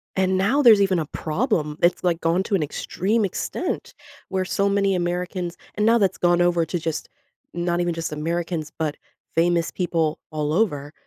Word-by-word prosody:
And 190 Hz, 0 st, +2 dB
now 225 Hz, +10 st, +2 dB
there's 225 Hz, -6 st, +7 dB
even 190 Hz, -3 st, +2 dB
a 155 Hz, -, -2 dB
problem, 155 Hz, -, -1 dB
it's, 175 Hz, +1 st, +3 dB
like, 170 Hz, -2 st, +1 dB
gone 170 Hz, +3 st, +2 dB
to 200 Hz, -, 0 dB
an 175 Hz, -, +1 dB
extreme 205 Hz, +8 st, -1 dB
extent, 190 Hz, -, -3 dB, 0.4 s
where 190 Hz, -1 st, -1 dB
so 200 Hz, +2 st, +1 dB
many 200 Hz, -1 st, +2 dB
Americans 175 Hz, 0 st, -2 dB, 0.2 s
and 210 Hz, +1 st, +1 dB
now 230 Hz, +1 st, +5 dB
that's 195 Hz, -4 st, +1 dB
gone 175 Hz, 0 st, +3 dB
over 175 Hz, -1 st, +3 dB
to 175 Hz, -, -3 dB
just 160 Hz, -1 st, -4 dB, 0.4 s
not 175 Hz, 0 st, -1 dB
even 175 Hz, -1 st, 0 dB
just 165 Hz, -1 st, -4 dB
Americans, 165 Hz, 0 st, -3 dB
but 155 Hz, -2 st, -1 dB, 0.4 s
famous 170 Hz, 0 st, +2 dB
people 165 Hz, -4 st, -1 dB
all 150 Hz, 0 st, -1 dB
over. 150 Hz, -7 st, 0 dB
175 Hz, 180 wpm, -23 LUFS, 165-190 Hz, 0.4 s, there's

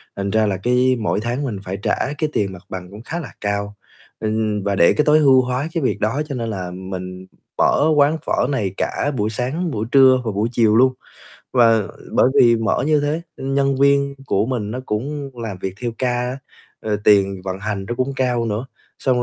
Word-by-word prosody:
thành 100 Hz, 0 st, -3 dB
ra 110 Hz, +1 st, +3 dB
là 95 Hz, -2 st, -1 dB
cái 125 Hz, +5 st, +2 dB
mỗi 110 Hz, -2 st, 0 dB
tháng 120 Hz, +5 st, -2 dB
mình 115 Hz, -8 st, -3 dB
phải 95 Hz, 0 st, -4 dB
trả -, -, +1 dB, 0.2 s
cái 155 Hz, -1 st, -1 dB
tiền 95 Hz, -2 st, 0 dB
mặt 90 Hz, -, -12 dB
bằng 90 Hz, -1 st, -7 dB
cũng 105 Hz, +2 st, -10 dB
khá 165 Hz, +7 st, -4 dB
là 150 Hz, -, -8 dB
cao, 100 Hz, 0 st, -2 dB, 0.4 s
ừm, 110 Hz, -1 st, -1 dB
và 100 Hz, 0 st, 0 dB
để 85 Hz, -, +5 dB
cái 150 Hz, -, +1 dB
tối 155 Hz, +1 st, +5 dB
ưu 135 Hz, -3 st, +6 dB
hóa 125 Hz, +3 st, -2 dB
cái 165 Hz, -5 st, -1 dB
việc 105 Hz, -, 0 dB
đó 110 Hz, +8 st, 0 dB
cho 140 Hz, -, -4 dB
nên 115 Hz, -2 st, -3 dB
là 90 Hz, -4 st, -4 dB
mình 90 Hz, 0 st, -7 dB, 0.3 s
mở -, -, +3 dB
quán 150 Hz, +2 st, +4 dB
phở -, -, +1 dB
này 110 Hz, -10 st, -1 dB
cả 145 Hz, -, -1 dB
buổi 105 Hz, 0 st, 0 dB
sáng, 135 Hz, -, -2 dB
buổi 110 Hz, -4 st, -2 dB
trưa 130 Hz, -2 st, +6 dB
và 110 Hz, -, -1 dB
buổi 105 Hz, +3 st, -1 dB
chiều 110 Hz, -3 st, +3 dB
luôn. 130 Hz, +2 st, +5 dB, 0.6 s
Và 115 Hz, -3 st, +5 dB, 0.3 s
bởi 125 Hz, -, +4 dB
vì 115 Hz, -1 st, +6 dB
mở 110 Hz, +3 st, 0 dB
như 150 Hz, -1 st, +3 dB
thế, 150 Hz, +3 st, -1 dB
ưm, 135 Hz, +1 st, -3 dB
nhân 140 Hz, -1 st, +2 dB
viên 140 Hz, 0 st, +3 dB
của 100 Hz, -, +1 dB
mình 115 Hz, -5 st, -2 dB
nó 125 Hz, +3 st, -4 dB
cũng 140 Hz, +6 st, -3 dB
làm 105 Hz, -5 st, -5 dB
việc 95 Hz, 0 st, -4 dB
theo 120 Hz, -, -1 dB
ca 130 Hz, -, 0 dB
á, 125 Hz, +2 st, -2 dB, 0.4 s
ờ, 105 Hz, -1 st, -1 dB
tiền 100 Hz, -2 st, +4 dB
vận 95 Hz, 0 st, -4 dB
hành 105 Hz, -2 st, -3 dB
nó 120 Hz, -, -2 dB
cũng 130 Hz, +2 st, -1 dB
cao 125 Hz, -3 st, 0 dB
nữa, 110 Hz, +4 st, -3 dB, 0.3 s
xong 125 Hz, -2 st, +1 dB
115 Hz, 220 wpm, -20 LUFS, 105-135 Hz, 0.6 s, ưu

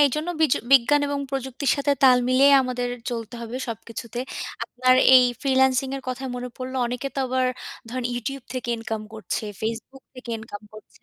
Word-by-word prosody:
এইজন্য 300 Hz, +4 st, +2 dB
বিজ 315 Hz, -5 st, +4 dB, 0.2 s
বিজ্ঞান 275 Hz, +3 st, +6 dB
এবং 285 Hz, 0 st, -2 dB
প্রযুক্তির 265 Hz, 0 st, -2 dB
সাথে 285 Hz, 0 st, +1 dB
তাল 255 Hz, -2 st, +7 dB
মিলিয়ে 270 Hz, +2 st, +5 dB
আমাদের 250 Hz, -1 st, -2 dB, 0.2 s
চলতে 230 Hz, 0 st, -5 dB
হবে 230 Hz, +2 st, -6 dB
সবকিছুতে। 230 Hz, +1 st, -7 dB, 0.5 s
আপনার 255 Hz, +1 st, +2 dB, 0.2 s
এই 255 Hz, -, +8 dB, 0.2 s
freelancing 265 Hz, -1 st, +2 dB
এর 270 Hz, -, -8 dB
কথায় 260 Hz, +1 st, -4 dB
মনে 250 Hz, 0 st, -5 dB
পড়লো 260 Hz, 0 st, -5 dB
অনেকে 250 Hz, +3 st, -3 dB
তো -, -, -4 dB
আবার 255 Hz, 0 st, +1 dB, 0.4 s
ধরেন 250 Hz, +1 st, -4 dB
YouTube 255 Hz, +2 st, -4 dB
থেকে 255 Hz, -1 st, -4 dB
income 225 Hz, -1 st, -5 dB
করছে, 215 Hz, 0 st, -4 dB, 0.2 s
Facebook 230 Hz, +4 st, -5 dB
থেকে 250 Hz, -2 st, -9 dB
income 215 Hz, -1 st, -9 dB
করছে। 215 Hz, -, -15 dB
255 Hz, 170 wpm, -24 LUFS, 235-270 Hz, 0.5 s, এই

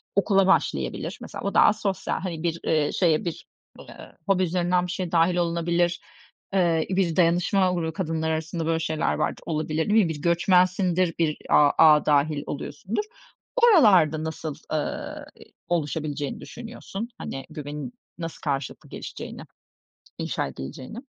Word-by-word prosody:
okula 195 Hz, -1 st, +3 dB
başlayabilir. 195 Hz, -, 0 dB
Mesela, -, -, -8 dB
o 200 Hz, -, -2 dB
daha 210 Hz, -, +6 dB
sosyal, 200 Hz, -3 st, -2 dB
hani, 170 Hz, -3 st, -4 dB
bir, 165 Hz, -1 st, -1 dB
eee, 155 Hz, -2 st, +2 dB
şeye 165 Hz, -3 st, +2 dB
bir, 170 Hz, -, -5 dB, 0.3 s
eee, -, -, -12 dB, 0.2 s
hobi 185 Hz, -1 st, +3 dB
üzerinden 180 Hz, +1 st, +1 dB
bir -, -, -4 dB
şey 180 Hz, -2 st, -3 dB
dâhil 170 Hz, +1 st, +3 dB
olunabilir. 170 Hz, 0 st, 0 dB, 0.5 s
Eee, 170 Hz, -4 st, +2 dB
bir 185 Hz, -3 st, +1 dB
dayanışma 180 Hz, +2 st, +3 dB
grubu 160 Hz, -2 st, -2 dB
kadınlar 160 Hz, -2 st, -2 dB
arasında, 160 Hz, +1 st, -3 dB
böyle, 165 Hz, 0 st, +1 dB
şeyler 155 Hz, -1 st, 0 dB
vardır, -, -, -2 dB
olabilir 155 Hz, +2 st, -1 dB
değil 215 Hz, +1 st, +5 dB
mi? -, -, -2 dB
Bir 150 Hz, -2 st, -5 dB
göçmensindir, 180 Hz, +1 st, +2 dB
bir 155 Hz, -2 st, +1 dB
a 145 Hz, -1 st, +6 dB
ağa 155 Hz, -2 st, +7 dB
dâhil 145 Hz, 0 st, +2 dB
oluyorsundur. 165 Hz, -, -4 dB, 0.5 s
Oralarda 205 Hz, -, +5 dB
nasıl, 160 Hz, -2 st, -4 dB, 0.2 s
ııı, 150 Hz, -, -3 dB
i -, -, -12 dB, 0.2 s
oluşabileceğini 150 Hz, -3 st, -2 dB
düşünüyorsun, 235 Hz, -2 st, -7 dB
hani, 135 Hz, -, -6 dB
güvenin 145 Hz, -3 st, -6 dB, 0.3 s
nasıl 165 Hz, -1 st, -6 dB
karşılıklı 140 Hz, -2 st, -3 dB
gelişeceğini, -, -, -8 dB, 0.8 s
inşa -, -, -2 dB
edileceğini? 75 Hz, -, -8 dB
170 Hz, 140 wpm, -25 LUFS, 155-185 Hz, 0.8 s, ağa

